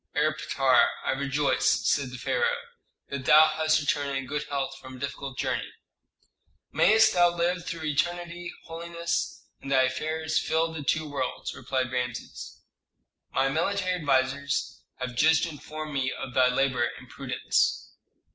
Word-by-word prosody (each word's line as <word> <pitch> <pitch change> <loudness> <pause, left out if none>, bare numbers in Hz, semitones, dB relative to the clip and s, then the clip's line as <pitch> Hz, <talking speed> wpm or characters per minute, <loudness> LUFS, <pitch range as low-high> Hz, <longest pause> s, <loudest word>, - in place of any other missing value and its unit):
"Erpatr, - - +3 0.2
I - - +2
rejoice," 140 +1 +1
said 140 -3 +2
the 125 - -8
pharaoh, - - 0 0.5
"that 140 -2 -5
thou 155 +2 +7
hast 155 0 +2
returned 145 -1 0
in 135 - -4
good 145 +3 -3
health 135 -1 -3
from 130 -1 -10
a - - -11
difficult 140 0 -5
journey." - - -2 1.0
"Mayst 220 +1 +5
thou 175 -1 +5
live 175 +1 -1
through 165 -2 -4
eternity, 175 +4 -2
holiness, 170 +1 -3 0.2
and 135 - -7
thy 130 -1 +5
affairs 160 +4 -1
fill 160 +1 0
the 160 - -5
two 155 +2 0
worlds!" 140 -3 -3
replied 130 -1 -2
Rameses. 125 -1 -5 0.7
"My 135 - +2
military 185 +5 0
advisers 140 -3 0 0.2
have 125 -1 -5
just 160 +5 +4
informed 155 -1 -7
me 130 -2 0
of 130 - -6
thy 130 0 +5
labor 125 -2 +1
and 125 +2 -13
prudence." 130 +1 -1
145 Hz, 145 wpm, -27 LUFS, 130-160 Hz, 1.0 s, thou